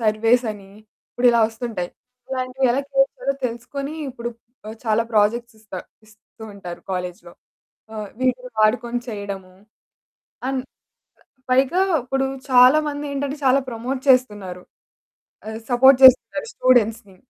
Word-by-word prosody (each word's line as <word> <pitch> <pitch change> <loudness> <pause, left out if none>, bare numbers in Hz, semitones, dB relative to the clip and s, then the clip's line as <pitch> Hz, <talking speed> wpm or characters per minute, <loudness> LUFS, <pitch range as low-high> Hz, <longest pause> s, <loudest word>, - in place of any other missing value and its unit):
Surveys 225 +3 +2
అని 195 -2 -14 0.4
ఇప్పుడిలా 245 -1 +3
వస్తుంటాయి. 225 -6 -5 0.4
ఇలాంటివి 255 0 -1
ఎలా 270 - +1
క్రియేట్ 270 0 +2
చేయాలో 275 - -2
తెలుసుకుని 275 +5 -6
ఆహ్, 300 - -4
ఇప్పుడు 240 -1 -6 0.5
చాలా 220 0 +2
ప్రాజెక్ట్స్ 230 +2 +1
ఇస్తా 200 -4 -8 0.3
ఇస్తూ 215 +1 -19
ఉంటారు 180 -3 -9
కాలేజ్‌లో. 180 -1 -5 0.6
ఆహ్, 210 -1 -5
వీటిని 250 -1 -1
వాడుకుని 235 +2 +1
చేయడము 200 -3 -6 0.9
అండ్ 265 -1 -1 0.9
పైగా 265 +8 +3 0.2
ఇప్పుడు 270 +2 -1 0.3
చాలా 255 +3 +7
మందేంటంటే 285 -1 -4
చాలా 265 +1 +4
ప్రమోట్ 245 +3 -4
చేస్తున్నారు. 205 -8 +2 0.8
ఆహ్, 220 +1 -6
సపోర్ట్ 255 +2 +6
చేస్తున్నారు 260 - +6
స్టూడెంట్స్‌ని. 225 -5 +2
240 Hz, 115 wpm, -21 LUFS, 215-260 Hz, 0.9 s, చాలా